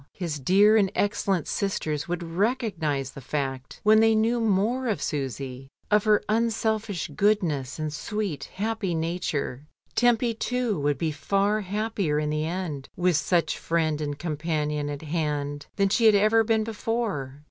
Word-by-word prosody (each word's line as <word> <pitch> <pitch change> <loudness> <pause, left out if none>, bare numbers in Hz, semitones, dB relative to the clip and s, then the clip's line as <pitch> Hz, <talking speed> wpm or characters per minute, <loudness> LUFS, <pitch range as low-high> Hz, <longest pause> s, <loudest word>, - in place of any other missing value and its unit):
His 165 -5 -4
dear 200 +9 +5
and 195 -3 +3
excellent 200 -5 0
sisters 155 -7 -2
would 175 0 -3
recognise 170 - -1
the 140 - -10
fact 135 -1 -4
when 215 +1 +6
they 225 0 +5
knew 230 +2 +2
more 225 +4 +1
of 215 - 0
Susy, 135 -3 -4 0.2
of 210 0 +4
her 210 -1 +4
unselfish 220 -3 0
goodness 155 - 0
and 155 -1 -3
sweet 195 - -3
happy 205 -3 -1
nature. 160 -4 -2 0.3
Tempy, 240 -1 +3
too, 240 -4 -1
would 145 -1 +1
be 160 +2 -1
far 200 +6 +1
happier 200 -5 -1
in 150 0 0
the 155 +1 -1
end 165 -6 -4
with 180 -1 +2
such 170 +2 +1
friend 160 -2 0
and 145 -1 -3
companion 150 -2 -2
at 145 +1 -5
hand, 145 -2 -2
than 200 -1 +2
she 225 +3 +4
had 215 - +6
ever 215 +2 +4
been 220 0 +2
before. 215 - -3
180 Hz, 155 wpm, -26 LUFS, 150-215 Hz, 0.3 s, when